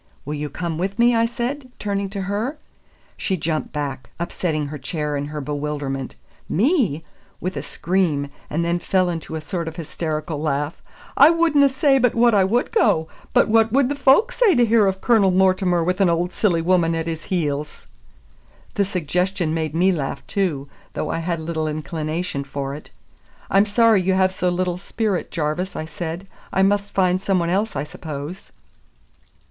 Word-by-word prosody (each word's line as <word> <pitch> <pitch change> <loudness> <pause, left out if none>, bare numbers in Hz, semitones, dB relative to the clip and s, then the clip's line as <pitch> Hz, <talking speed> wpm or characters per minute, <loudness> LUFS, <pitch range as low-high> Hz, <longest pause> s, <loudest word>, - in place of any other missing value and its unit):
"Will 150 - -3
you 150 0 -3
come 170 -1 -4
with 195 +3 -2
me?" 240 0 +4
I 230 0 +3
said, 255 +3 -4
turning 200 -1 -2
to 200 0 -4
her. 215 +10 -2 0.6
She 190 - -1
jumped 155 -1 -2
back, 140 -3 -4
upsetting 170 -3 -2
her 145 +1 -6
chair 150 0 -3
in 140 0 -2
her 150 0 -5
bewilderment. 145 -2 -3 0.3
"Me!" 210 - +2 0.4
with 185 +1 -3
a - - -3
scream, 170 -6 0 0.2
and 165 +3 -1
then 170 +1 0
fell 185 0 +1
into 165 -1 -5
a 160 - -4
sort 165 +2 -4
of 160 - -5
hysterical 155 -1 -4
laugh. 150 +1 -2 0.3
"I 285 +3 +8
wouldna 325 -4 +4
say 270 0 +3
but 250 -2 +2
what 235 0 +4
I 200 -2 +5
would 230 +7 +1
go; 160 - +2 0.2
but - - +4
what 225 0 +3
would 265 +1 +3
the 290 - -1
folk 280 - +4
say 470 -8 +3
to 245 -1 +5
hear 220 -2 +4
of 190 0 -1
Cornel 220 -5 +4
Mortimer 185 -2 +3
with 180 +3 0
an 190 - +5
auld 175 +1 0
silly 175 -6 +1
woman 170 -2 +2
at 165 0 -2
his 165 -1 -4
heels?" 150 -5 -2 0.9
The 200 - +1
suggestion 180 -1 -1
made 160 -1 -2
me 185 +3 +4
laugh 140 -5 -3
too, 160 -9 -1 0.3
though - - -2
I - - -2
had 170 0 -2
little 160 -1 -2
inclination 155 0 -3
for 140 0 -4
it. 150 - -9 0.6
"I'm 195 +2 +4
sorry 220 -1 +4
you 190 +1 +1
have 190 0 +3
so 180 -1 0
little 180 0 -1
spirit, 205 -1 -2
Jarvis," 165 +3 -2
I 155 - -3
said. 165 +3 -5 0.3
"I 190 - +2
must 200 +1 +1
find 185 -1 +2
some 195 -1 +1
one 170 -1 0
else, 205 +2 0
I 140 - -1
suppose." 150 +3 -7
180 Hz, 185 wpm, -22 LUFS, 155-200 Hz, 0.9 s, I